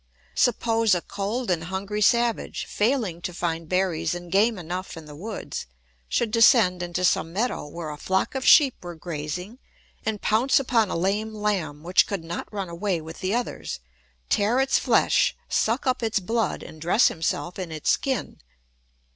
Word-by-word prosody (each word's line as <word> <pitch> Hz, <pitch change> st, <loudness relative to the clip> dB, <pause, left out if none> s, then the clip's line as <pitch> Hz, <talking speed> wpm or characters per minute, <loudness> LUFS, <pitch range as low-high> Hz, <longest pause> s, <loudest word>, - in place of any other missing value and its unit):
] -, -, -33 dB
Suppose 225 Hz, -3 st, +2 dB
a 175 Hz, -, -1 dB
cold 205 Hz, +5 st, -3 dB
and 165 Hz, -2 st, -1 dB
hungry 195 Hz, +3 st, -3 dB
savage, 235 Hz, +1 st, +2 dB
failing 210 Hz, -7 st, 0 dB
to 180 Hz, -, -4 dB
find 165 Hz, -2 st, -3 dB
berries 175 Hz, -3 st, 0 dB
and 175 Hz, -1 st, -8 dB
game 210 Hz, +4 st, +3 dB
enough 180 Hz, +1 st, -5 dB
in 160 Hz, -, -9 dB
the 150 Hz, -1 st, -11 dB
woods, 200 Hz, -, -6 dB, 0.4 s
should 230 Hz, -2 st, 0 dB
descend 225 Hz, -6 st, +5 dB
into 175 Hz, +1 st, -1 dB
some 165 Hz, -2 st, +1 dB
meadow 215 Hz, -3 st, -2 dB
where 160 Hz, 0 st, -6 dB
a 150 Hz, -, -7 dB
flock 190 Hz, +2 st, 0 dB
of 265 Hz, -1 st, -3 dB
sheep 275 Hz, -3 st, +7 dB
were 175 Hz, -1 st, -7 dB
grazing 170 Hz, -, -6 dB, 0.4 s
and 220 Hz, -2 st, -2 dB
pounce 230 Hz, +8 st, +3 dB
upon 235 Hz, -6 st, +2 dB
a -, -, -2 dB
lame 205 Hz, +5 st, -1 dB
lamb 185 Hz, -9 st, -2 dB
which 180 Hz, +2 st, +4 dB
could 195 Hz, -5 st, -3 dB
not 165 Hz, +1 st, -6 dB
run 200 Hz, -3 st, -4 dB
away 175 Hz, +1 st, -2 dB
with 160 Hz, +1 st, -9 dB
the 190 Hz, +3 st, -1 dB
others, 245 Hz, -, -3 dB, 0.5 s
tear 215 Hz, +5 st, +2 dB
its 270 Hz, 0 st, +3 dB
flesh, -, -, +3 dB
suck 230 Hz, +4 st, 0 dB
up 255 Hz, -1 st, +1 dB
its 225 Hz, -1 st, +1 dB
blood, 225 Hz, +3 st, -1 dB
and 155 Hz, -, -12 dB
dress 180 Hz, +8 st, +4 dB
himself 175 Hz, +2 st, -3 dB
in 180 Hz, -3 st, -5 dB
its 155 Hz, -2 st, 0 dB
skin. 265 Hz, -2 st, -2 dB
195 Hz, 175 wpm, -25 LUFS, 170-225 Hz, 0.5 s, sheep